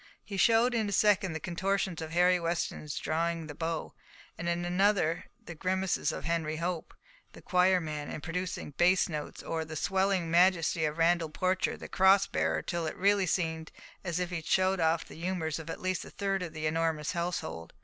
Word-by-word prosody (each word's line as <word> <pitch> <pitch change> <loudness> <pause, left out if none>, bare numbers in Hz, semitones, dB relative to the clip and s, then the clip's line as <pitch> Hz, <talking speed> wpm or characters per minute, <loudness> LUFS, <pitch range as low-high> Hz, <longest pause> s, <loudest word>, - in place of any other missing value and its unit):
He 200 - -7
showed 230 +5 +4
in 220 -3 0
a - - -4
second 195 -3 +3
the 160 - -3
contortions 185 0 -1
of 160 - -5
Harry 180 +2 +4
Weston 170 0 -2
in 150 - -11
drawing 165 +1 -1
the 150 - -7
bow, 165 +1 -3 0.4
and 170 +1 -3
in 170 0 -1
another 180 -2 +2
the 170 - -9
grimaces 185 -1 0
of - - -6
Henry 165 -2 -1
Hope, 170 +1 -3 0.4
the - - -12
choir 180 0 +4
man, 150 -3 -5
in - - -5
producing 175 0 -4
bass 180 +6 +3
notes, 150 -3 -6
or 165 -1 -2
the 155 0 -8
swelling 190 -1 +1
majesty 170 -2 +3
of 150 +1 -2
Randall 165 -1 +3
Porcher, 185 +4 0
the - - -8
cross 195 +1 +5
bearer, - - -1
till 170 -2 -2
it - - -5
really 200 0 +3
seemed 160 -2 -1 0.3
as 175 -2 -2
if 180 0 -2
he 180 - -2
had 160 - -8
shown 190 0 +2
off 165 0 +2
the - - -13
humours 165 -2 -2
of 160 0 -8
at - - -5
least 185 0 -1
a - - -10
third 195 -1 -2
of 170 -3 -5
the 155 -1 -4
enormous 160 -1 0
household. 170 - -3
170 Hz, 200 wpm, -30 LUFS, 160-185 Hz, 0.4 s, cross